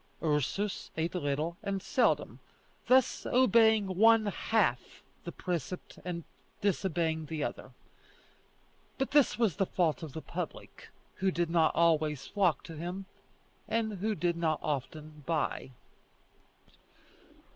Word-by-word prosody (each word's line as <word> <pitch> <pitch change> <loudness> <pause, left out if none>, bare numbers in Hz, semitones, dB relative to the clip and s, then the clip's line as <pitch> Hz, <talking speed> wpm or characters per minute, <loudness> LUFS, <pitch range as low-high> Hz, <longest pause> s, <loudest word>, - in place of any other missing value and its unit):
Ursus 160 +7 -1
ate 165 +1 -1
little 155 0 -2
and 195 -1 -2
seldom, - - +1 0.5
thus 260 0 +4
obeying 225 -4 +5
one 225 0 +6
half 205 - 0 0.2
the 170 - -4
precept 175 0 -5
and 175 -1 -4 0.4
disobeying 165 -5 0
the 155 -1 -3
other; - - -5 1.3
but 270 - -1
this 290 -2 +4
was 225 -9 +1
the 195 - +2
fault 170 -3 0
of 155 -5 -7
the 160 - -5
public, - - -7 0.3
who 190 0 +1
did 175 -2 -1
not 165 -2 +3
always 155 -4 +2
flock 180 -8 +1
to 165 - -9
him, 175 +5 -5 0.6
and 220 -3 -1
who 215 +2 0
did 175 -2 0
not 160 -2 +1
often 150 +1 -4
buy. 160 -4 -1
170 Hz, 125 wpm, -31 LUFS, 155-205 Hz, 1.3 s, one